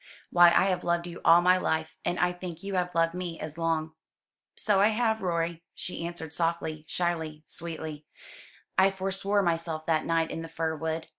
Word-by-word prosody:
Why 175 0 +8
I 170 +2 +5
have 185 -2 0
loved 170 0 0
you 175 -1 -8
all 170 +1 +7
my 180 +1 +5
life; 160 -2 -1
and 175 - -1
I 180 0 +3
think 175 -1 -8
you 200 0 -4
have 180 -2 -1
loved 165 0 +3
me 175 -2 -5
as 155 -1 -6
long." 160 -1 -1 0.6
"So 205 -2 +2
I 205 - +6
have, 220 0 +1
Rorie," 170 -2 -1
she 170 -1 -5
answered 160 -3 -7
softly, 165 -2 -2
shyly, 160 -3 -2
sweetly. 160 -2 -6 0.7
"I 190 +1 +6
forswore 195 +1 0
myself 165 -2 -1
that 160 -2 +1
night 165 -1 +1
in 165 - -4
the 165 - -6
fir 160 0 -2
wood. 160 +1 -3
170 Hz, 190 wpm, -28 LUFS, 160-180 Hz, 0.7 s, Why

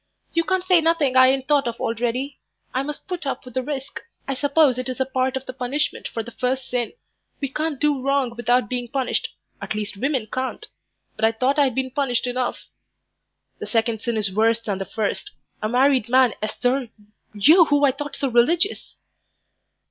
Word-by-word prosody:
"You 335 - +2
can't 375 -1 0
say 365 -2 +4
nothing 320 -5 +2
I 255 0 +8
ain't 265 0 +1
thought 285 -3 +3
of 235 - -4
already. 245 +4 -2 0.3
I 260 - +1
must 290 +1 -6
put 355 -6 -4
up 270 - -3
with 250 - -11
the 260 - 0
risk. 275 0 -5 0.3
I 275 - 0
suppose 280 -1 +3
it 255 0 -3
is 255 - -5
a 265 - +2
part 260 0 0
of 265 - -7
the 255 - -6
punishment 260 +3 -2
for 225 - -4
the 235 - -10
first 255 +2 -2
sin. 245 -2 -1 0.5
We 275 - -2
can't 305 0 -2
do 295 -3 +1
wrong 270 -3 0
without 240 -1 +2
being 245 +1 -3
punished 260 +1 -1 0.3
at - - -4
least 210 -1 -4
women 265 0 0
can't. 255 +4 -4 0.5
But 220 - +1
I 225 - +4
thought 255 +6 +1
I'd 270 -4 +3
been 260 -1 -1
punished 260 -3 0
enough." 250 0 -2 0.9
"The - - -6
second 225 -1 0
sin 235 -2 -1
is 200 -3 0
worse 225 +2 +3
than 205 -4 -3
the 195 - -3
first. 220 - -3 0.3
A 215 - -1
married 255 -1 +3
man, 255 -2 +5
Esther 245 +4 -1 0.5
you 320 - +7
who 290 -1 +3
I 275 - +4
thought 290 +2 -6
so 275 - -1
religious." 315 - +2
260 Hz, 195 wpm, -23 LUFS, 235-280 Hz, 0.9 s, I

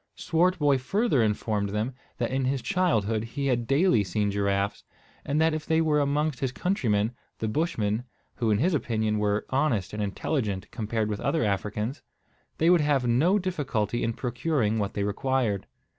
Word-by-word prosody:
Swartboy 165 -5 +2
further 195 - +1
informed 105 -1 0
them 105 +5 -2 0.2
that 120 0 -1
in 130 0 0
his 135 0 -1
childhood 115 - +1
he 130 +5 -4
had 120 -3 0
daily 140 - +3
seen 100 +2 -1
giraffes; 100 0 0 0.4
and 145 +2 0
that 160 0 +3
if 155 0 -3
they 160 0 +3
were 155 -2 +3
amongst 145 -1 0
his 130 -2 -1
countrymen, 120 - 0 0.3
the 110 - -2
Bushmen, 110 -5 0 0.3
who, 115 -4 0
in 105 - +3
his 170 - +2
opinion, 110 -6 0
were 105 0 0
honest 130 -10 +1
and 105 - -3
intelligent 105 -1 -2
compared 110 -1 -2
with 105 -1 -3
other 160 - +1
Africans, 105 +5 -2 0.6
they 165 +2 +4
would 175 -3 +5
have 145 -4 +2
no 145 - +3
difficulty 140 - -1
in 115 - 0
procuring 120 -2 0
what 100 -1 -2
they 100 - 0
required. 110 0 0
120 Hz, 170 wpm, -27 LUFS, 105-150 Hz, 0.6 s, would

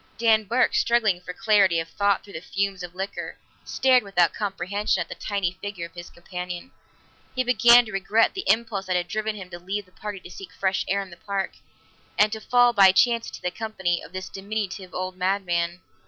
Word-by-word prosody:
Dan 220 -2 +3
Burke, 240 +5 +2
struggling 220 -6 +2
for 180 - -7
clarity 195 -3 +3
of 165 - -4
thought 200 +3 +1
through 200 - -14
the 160 - -6
fumes 195 +1 -2
of 175 0 -8
liquor, 190 +2 -5 0.3
stared 260 -1 +3
without 180 -5 +2
comprehension 200 0 -1
at 170 - -2
the - - -4
tiny 185 -3 -3
figure 200 -4 -5
of 170 - -13
his 175 -1 -9
companion. 180 +4 -7 0.6
He 255 - +1
began 245 -1 +6
to 215 - -9
regret 205 +3 +2
the 385 - -4
impulse 220 -4 +1
that 185 - 0
had 175 -1 0
driven 215 +2 -2
him 190 -3 -9
to 175 - -7
leave 195 +3 -4
the 185 - -26
party 205 +1 -7
to - - -12
seek 390 -3 -10
fresh 190 0 0
air 200 +1 0
in 190 - -13
the 170 - -12
park, 200 -2 -3 0.7
and 210 0 +4
to 220 0 -5
fall 245 0 +4
by 195 -3 +7
chance 235 +3 +3
into - - -9
the 180 - -1
company 190 -4 -2
of - - -12
this 185 0 -6
diminutive 195 -2 -5
old 185 0 -4
madman. 180 -2 -1
195 Hz, 210 wpm, -25 LUFS, 180-215 Hz, 0.7 s, by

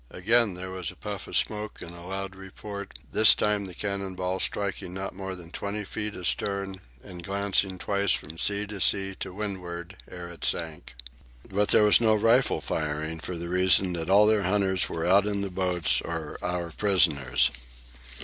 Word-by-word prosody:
Again 110 +1 +2
there 95 +1 -6
was 90 -4 -3
a - - -10
puff - - -6
of - - 0
smoke 105 0 -1
and 85 - -9
a 85 - -11
loud 95 +2 -5
report, 100 +1 -9
this 110 - +7
time 105 -1 0
the 90 -2 -7
cannon 100 -2 -3
ball 90 +1 -2
striking 100 -3 -2
not 95 +1 -4
more 95 0 -5
than 85 -2 -11
twenty 100 +2 -4
feet 105 +1 -4
astern 95 +1 +1 0.2
and 90 -1 -10
glancing 100 -1 0
twice 100 0 0
from 80 +2 -2
sea 105 0 +1
to 105 -2 -7
sea 95 0 +2
to - - -4
windward 95 -3 -6
ere 90 -1 -8
it 85 - -11
sank. 80 -6 -2 0.5
But 100 +1 0
there - - +5
was 105 +2 +6
no 110 -2 +4
rifle 115 +5 +3
firing 80 +1 -3
for 85 +1 -5
the 85 +1 -5
reason 90 0 +4
that 85 0 -3
all 100 +2 +6
their 110 -1 +3
hunters 95 -1 +1
were 80 - -3
out 100 +3 +4
in 100 -1 -1
the 100 -1 -3
boats 90 -2 +1
or - - -5
our 90 -1 -3
prisoners. 80 - +3
95 Hz, 185 wpm, -27 LUFS, 90-100 Hz, 0.5 s, this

